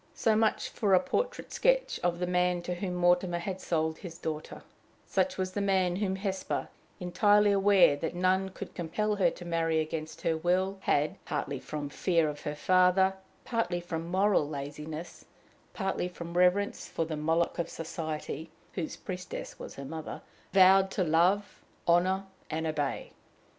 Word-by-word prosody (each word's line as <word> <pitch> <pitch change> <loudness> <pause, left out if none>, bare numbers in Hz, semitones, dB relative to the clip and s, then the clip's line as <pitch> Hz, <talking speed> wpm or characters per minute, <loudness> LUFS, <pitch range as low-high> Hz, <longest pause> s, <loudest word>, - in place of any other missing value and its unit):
So 220 -1 +2
much 220 0 +1
for 200 -3 +2
a - - +6
portrait - - -2
sketch - - +2
of 175 -1 +1
the 180 - -1
man 180 0 +1
to 180 - -2
whom 180 0 -3
Mortimer 175 0 +3
had 185 +2 -4
sold 160 -1 -1
his 170 -4 -8
daughter 155 -2 -5 0.4
such 270 - 0
was 185 -1 -1
the 205 - -2
man 190 -3 +2
whom 190 -2 0
Hesper, 190 -1 -3 0.3
entirely 205 +3 +4
aware 195 -6 +5
that 160 +4 -4
none 185 +2 +2
could 190 - -8
compel 205 +5 -1
her 195 - +4
to 175 - -10
marry 165 -1 +1
against 155 0 -4
her 165 - +2
will, 185 +4 0
had, 150 -3 0
partly 140 -1 -3
from 150 +1 -5
fear 165 +1 +1
of 145 0 -7
her 150 - -4
father, 185 +3 +4 0.3
partly 230 -7 0
from 170 -1 -5
moral 190 -5 +2
laziness, 150 +3 -7 0.5
partly 195 -3 -2
from 170 -1 -8
reverence 180 +3 +2
for 165 - -2
the 160 -1 -4
Moloch 165 +3 0
of 170 - -1
society, 160 -1 -5 0.2
whose 165 -4 -3
priestess 180 -1 -7
was - - -8
her 140 - -7
mother, 160 +2 -6 0.3
vowed 190 0 +6
to 190 - 0
love, 180 +5 +2 0.2
honor, 185 +3 +3 0.2
and 160 +1 -2
obey! 150 -3 -2
180 Hz, 165 wpm, -30 LUFS, 160-190 Hz, 0.5 s, a